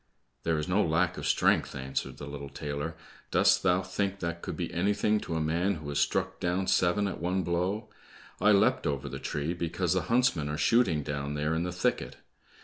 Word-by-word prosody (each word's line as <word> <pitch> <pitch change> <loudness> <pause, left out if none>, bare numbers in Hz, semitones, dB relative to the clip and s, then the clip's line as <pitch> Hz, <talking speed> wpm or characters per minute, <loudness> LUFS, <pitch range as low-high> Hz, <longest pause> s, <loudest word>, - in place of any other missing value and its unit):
"There 80 -1 0
is 75 - -2
no 95 +3 +2
lack 85 +2 +1
of - - -3
strength," - - +2
answered 65 0 -4
the 70 - -7
little 70 -1 -7
tailor. 75 +3 -4 0.3
"Dost - - +4
thou 95 0 +2
think 95 +1 -2
that 85 -2 -4
could - - -5
be - - -3
anything 105 +4 +2
to 85 - -4
a - - 0
man 85 +6 +1
who 75 -2 -7
has 70 0 -1
struck - - 0
down 90 +2 0
seven 95 +3 +2
at 100 - -5
one 90 +3 0
blow? 90 +6 -1 0.5
I 105 +3 +5
leapt 100 - +3
over 70 -1 -2
the 65 - -6
tree 75 +3 -2
because 85 -2 -1
the - - +1
huntsmen 115 -12 +2
are 75 - -2
shooting 80 -2 +3
down 70 0 -3
there 75 +2 0
in 80 +2 0
the 90 - -2
thicket. 90 0 -1
85 Hz, 205 wpm, -29 LUFS, 75-95 Hz, 0.5 s, I